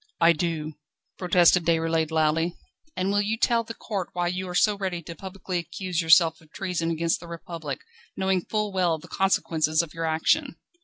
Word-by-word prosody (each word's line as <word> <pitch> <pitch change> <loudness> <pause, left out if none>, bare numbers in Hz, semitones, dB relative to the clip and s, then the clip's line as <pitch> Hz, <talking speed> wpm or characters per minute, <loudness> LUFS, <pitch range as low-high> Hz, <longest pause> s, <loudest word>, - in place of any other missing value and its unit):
"I 170 0 +6
do," 160 -1 -3 0.5
protested 180 -1 +4
Déroulède 165 -1 +1
loudly. 160 +2 +1 0.4
"And 190 +2 0
will 205 0 +2
you 215 +2 -1
tell 235 0 +2
the 225 0 -8
court 195 -5 -4
why 175 -1 0
you 185 +1 -3
are 180 - -5
so 210 +2 +4
ready 185 -4 -3
to 170 - -7
publicly 190 0 -5
accuse 175 +1 -3
yourself 165 0 +5
of 155 -2 -22
treason 180 -4 -2
against 165 0 0
the 170 - -11
Republic, 170 -1 -6 0.4
knowing 190 -1 +1
full 210 -1 -2
well 180 -3 +2
all - - -1
the 160 +3 -13
consequences 160 -4 +1
of 160 - -10
your 165 0 -3
action?" 255 - +1
175 Hz, 190 wpm, -26 LUFS, 165-190 Hz, 0.5 s, I